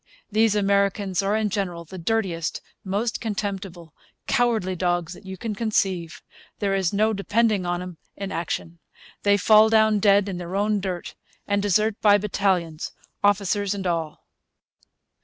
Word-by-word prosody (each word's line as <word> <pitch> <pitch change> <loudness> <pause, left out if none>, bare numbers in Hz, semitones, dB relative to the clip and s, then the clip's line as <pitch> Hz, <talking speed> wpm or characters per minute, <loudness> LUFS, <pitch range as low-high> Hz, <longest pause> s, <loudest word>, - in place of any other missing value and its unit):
These 215 0 +3
Americans 200 -1 +1
are 200 +2 0
in 215 -2 0
general 180 -4 -3
the 185 +3 -9
dirtiest, 175 -4 -1 0.2
most 205 +4 -2
contemptible, 195 -6 -4 0.3
cowardly 225 -7 +1
dogs 175 -1 -1
that 190 - -14
you 190 0 -6
can 220 +3 -4
conceive. 195 -6 -1 0.3
There 200 -2 0
is 190 -3 +1
no 215 +2 +2
depending 210 -1 +1
upon 175 0 -2
'em 180 -2 -9 0.2
in 195 0 -5
action. 170 -1 -4 0.4
They 205 0 +4
fall 215 +2 +6
down 220 -1 +4
dead 200 0 +4
in 185 -3 -4
their 175 +1 -6
own 205 +1 +1
dirt, 185 -2 -4 0.3
and 200 0 +1
desert 205 +2 +1
by 205 -1 +6
battalions, 185 -5 -1 0.3
officers 205 0 +2
and 195 -1 -5
all.' 165 -3 -2
200 Hz, 150 wpm, -24 LUFS, 180-210 Hz, 0.4 s, fall